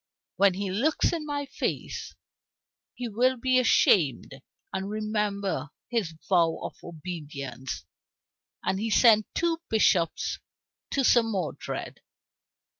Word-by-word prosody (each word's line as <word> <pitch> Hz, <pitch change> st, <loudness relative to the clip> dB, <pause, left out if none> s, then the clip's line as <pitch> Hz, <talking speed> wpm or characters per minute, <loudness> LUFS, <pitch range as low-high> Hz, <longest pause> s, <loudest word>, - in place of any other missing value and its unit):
When 195 Hz, -2 st, +4 dB
he 195 Hz, 0 st, -2 dB
looks 275 Hz, -, +1 dB
in 315 Hz, -3 st, -3 dB
my 285 Hz, -1 st, -2 dB
face, -, -, -4 dB, 0.8 s
he 245 Hz, -, -4 dB
will 250 Hz, +4 st, +2 dB
be 255 Hz, +1 st, +3 dB
ashamed 140 Hz, -, +3 dB, 0.3 s
and 190 Hz, +1 st, -3 dB
remember 210 Hz, -7 st, -2 dB, 0.2 s
his 200 Hz, -9 st, -1 dB
vow 170 Hz, -4 st, +3 dB
of -, -, -5 dB
obedience." 145 Hz, -, -6 dB, 0.8 s
And 190 Hz, +1 st, 0 dB
he 225 Hz, +2 st, -1 dB
sent 215 Hz, -1 st, +5 dB
two 335 Hz, -1 st, 0 dB
bishops 180 Hz, -6 st, +2 dB, 0.5 s
to 275 Hz, -, 0 dB
Sir 240 Hz, -1 st, +6 dB
Modred. 200 Hz, -8 st, -4 dB
200 Hz, 115 wpm, -27 LUFS, 165-240 Hz, 0.8 s, Sir